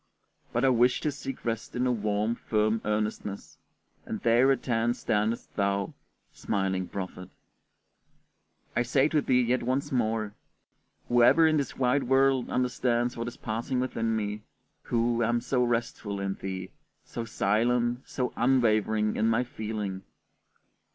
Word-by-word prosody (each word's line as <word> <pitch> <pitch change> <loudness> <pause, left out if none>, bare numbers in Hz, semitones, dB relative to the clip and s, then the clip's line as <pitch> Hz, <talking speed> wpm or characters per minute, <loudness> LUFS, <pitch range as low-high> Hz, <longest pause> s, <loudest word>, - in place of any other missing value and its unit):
But 120 +3 +1
I - - +5
wish 125 0 +3
to 150 - 0
seek 135 -2 -7
rest 115 -1 -3
in 125 +1 +1
a 125 - +2
warm, 105 -1 0
firm 110 -1 0
earnestness, 105 -1 -3 0.4
and - - -5
there 120 +4 +4
at 135 - -1
hand 120 -1 +1
standest 110 +2 -1
thou, 100 -1 0 0.4
smiling 95 -3 -1
prophet! 90 -1 -6 1.5
I 120 - +3
say 130 +3 +3
to 155 -1 +2
thee 125 -2 +3
yet 125 +2 +1
once 130 +4 -1
more: 110 -4 0 0.7
Whoever 120 +7 +5
in 155 -1 +4
this 140 - -2
wide 130 +2 +2
world 135 0 +3
understands 125 -1 0
what 115 0 -4
is 120 - -7
passing 115 +3 -2
within 115 -3 -1
me, 105 -1 -3 0.4
who, 120 0 0
am 120 +1 +2
so 125 +1 0
restful 115 -4 -2
in 100 0 -1
thee, 95 -1 -6 0.3
so 115 - -5
silent, 120 +3 +1
so 125 -2 -2
unwavering 110 -4 +2
in 110 - +2
my 115 +2 +2
feeling? 105 -5 -4
115 Hz, 145 wpm, -28 LUFS, 105-125 Hz, 1.5 s, I